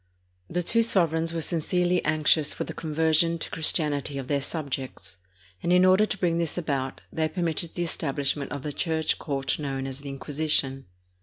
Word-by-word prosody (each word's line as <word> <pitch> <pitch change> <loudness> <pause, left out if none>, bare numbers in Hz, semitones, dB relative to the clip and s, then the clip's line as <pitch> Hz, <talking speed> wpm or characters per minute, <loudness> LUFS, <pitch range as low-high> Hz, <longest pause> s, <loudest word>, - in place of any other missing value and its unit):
The 180 +1 -1
two 230 +6 +3
sovereigns 165 -7 +2
were 165 -1 -1
sincerely 180 +2 +1
anxious 155 -1 +2
for - - -2
the - - -6
conversion 160 +1 +1
to - - -5
Christianity 150 -3 +1
of 135 -2 -5
their 140 0 +1
subjects, 130 - -5 0.4
and 175 - 0
in 180 +1 +6
order 190 +3 +5
to 210 - -2
bring 170 -3 +1
this 170 0 -1
about, 140 -6 -2
they 160 -1 +1
permitted 170 -1 -2
the 175 - 0
establishment 140 -3 -1
of 140 -2 -5
the 150 - -4
church 160 -1 0
court 135 -2 -2
known 135 -2 -3
as 135 0 -5
the 140 0 -8
Inquisition. 135 -2 0
155 Hz, 175 wpm, -26 LUFS, 140-170 Hz, 0.4 s, in